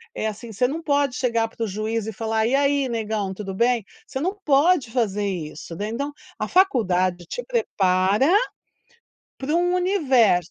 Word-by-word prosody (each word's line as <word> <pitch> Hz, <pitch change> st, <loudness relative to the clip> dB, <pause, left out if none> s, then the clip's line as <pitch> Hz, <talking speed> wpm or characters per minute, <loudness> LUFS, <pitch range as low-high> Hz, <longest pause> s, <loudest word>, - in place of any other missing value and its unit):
é 220 Hz, -, -1 dB
assim, 220 Hz, +2 st, -7 dB
você 250 Hz, +5 st, +2 dB
não 315 Hz, +5 st, -4 dB
pode 285 Hz, -4 st, +1 dB
chegar 230 Hz, -3 st, +1 dB
para 230 Hz, -, -5 dB
o -, -, -4 dB
juiz 215 Hz, +2 st, -2 dB
e 220 Hz, -, -4 dB
falar: 220 Hz, +1 st, 0 dB
"E 245 Hz, -, 0 dB
aí, 280 Hz, -1 st, +2 dB
negão 215 Hz, -4 st, -2 dB
tudo 195 Hz, -1 st, -6 dB
bem?". 235 Hz, +1 st, +2 dB, 0.2 s
Você 265 Hz, -, -4 dB
não 375 Hz, +6 st, -1 dB
pode 290 Hz, -2 st, +3 dB
fazer 210 Hz, -4 st, 0 dB
isso, 165 Hz, -3 st, -5 dB
né, 205 Hz, +5 st, -3 dB
então, 280 Hz, +6 st, -3 dB, 0.3 s
a -, -, -1 dB
faculdade 185 Hz, -, +2 dB
te -, -, -5 dB
prepara 200 Hz, -, +2 dB, 1.1 s
para 280 Hz, +4 st, -2 dB
um 355 Hz, +1 st, +2 dB
universo. 265 Hz, -, +3 dB
230 Hz, 170 wpm, -23 LUFS, 205-285 Hz, 1.1 s, pode